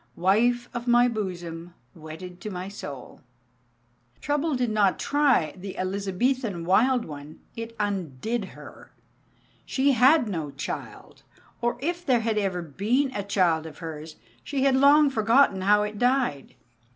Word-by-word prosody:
Wife 240 Hz, +7 st, +2 dB
of 240 Hz, 0 st, -5 dB
my 240 Hz, 0 st, +5 dB
bosom, 175 Hz, -6 st, -5 dB, 0.2 s
wedded 165 Hz, +3 st, -10 dB
to 215 Hz, -, -5 dB
my 185 Hz, -1 st, -5 dB
soul! 145 Hz, -10 st, -9 dB, 1.0 s
Trouble 295 Hz, +1 st, -1 dB
did 245 Hz, -3 st, 0 dB
not 205 Hz, -3 st, +2 dB
"try" 280 Hz, -, +2 dB
the 190 Hz, +1 st, -8 dB
Elizabethan 200 Hz, +1 st, -1 dB
wild 240 Hz, +7 st, +3 dB
one, 150 Hz, 0 st, -10 dB, 0.2 s
it 230 Hz, 0 st, -7 dB
undid 200 Hz, -, -2 dB
her. -, -, -13 dB, 0.7 s
She 280 Hz, +1 st, +1 dB
had 260 Hz, +2 st, +5 dB
no 165 Hz, -7 st, -3 dB
child, 140 Hz, +1 st, -7 dB, 0.4 s
or 240 Hz, 0 st, 0 dB
if 345 Hz, +4 st, -2 dB
there 255 Hz, -7 st, +2 dB
had 220 Hz, -1 st, 0 dB
ever 185 Hz, -3 st, -2 dB
been 225 Hz, -, 0 dB
a 205 Hz, -, -1 dB
child 180 Hz, -5 st, +1 dB
of 150 Hz, -, -11 dB
hers, 160 Hz, -2 st, -8 dB, 0.3 s
she 275 Hz, -2 st, -2 dB
had 270 Hz, -1 st, +4 dB
long 285 Hz, +2 st, +5 dB
forgotten 225 Hz, -3 st, +3 dB
how 210 Hz, +2 st, +4 dB
it 210 Hz, 0 st, -5 dB
died. 245 Hz, -, 0 dB
210 Hz, 140 wpm, -25 LUFS, 180-250 Hz, 1.0 s, my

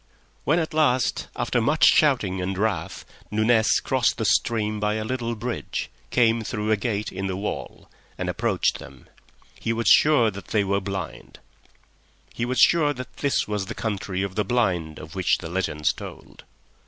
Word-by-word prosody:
When 160 Hz, -, +3 dB
at 160 Hz, -3 st, -1 dB
last, 130 Hz, -5 st, +1 dB
after 120 Hz, 0 st, 0 dB
much 155 Hz, +8 st, +3 dB
shouting 110 Hz, -11 st, +3 dB
and 95 Hz, +1 st, -3 dB
wrath, 110 Hz, +2 st, -2 dB, 0.2 s
Nunez 110 Hz, +1 st, +3 dB
crossed -, -, +1 dB
the -, -, -2 dB
stream 110 Hz, -2 st, +1 dB
by 105 Hz, 0 st, 0 dB
a 110 Hz, -, -2 dB
little 120 Hz, 0 st, -2 dB
bridge, 120 Hz, +2 st, -4 dB, 0.2 s
came 115 Hz, -2 st, +3 dB
through 105 Hz, -1 st, -2 dB
a -, -, +5 dB
gate 105 Hz, 0 st, -2 dB
in 95 Hz, +1 st, -4 dB
the 95 Hz, -, -2 dB
wall, 100 Hz, +2 st, -5 dB, 0.3 s
and -, -, -3 dB
approached -, -, 0 dB
them, 70 Hz, -2 st, -13 dB, 0.5 s
he 115 Hz, -, -1 dB
was 115 Hz, 0 st, -1 dB
sure 145 Hz, -8 st, +5 dB
that 100 Hz, 0 st, -10 dB
they 105 Hz, -2 st, +1 dB
were 100 Hz, 0 st, 0 dB
blind. 95 Hz, 0 st, -6 dB, 1.0 s
He 115 Hz, -, -2 dB
was 130 Hz, +1 st, -2 dB
sure 150 Hz, -4 st, +5 dB
that 130 Hz, -2 st, -9 dB
this 140 Hz, -1 st, 0 dB
was 105 Hz, -2 st, -2 dB
the -, -, -6 dB
Country 100 Hz, -3 st, -3 dB
of 100 Hz, -2 st, -4 dB
the 105 Hz, -, 0 dB
Blind 90 Hz, -9 st, 0 dB
of 80 Hz, +1 st, -10 dB
which 95 Hz, -2 st, +2 dB
the 80 Hz, -, -8 dB
legends 85 Hz, -4 st, 0 dB
told. -, -, -11 dB
110 Hz, 175 wpm, -24 LUFS, 95-120 Hz, 1.0 s, a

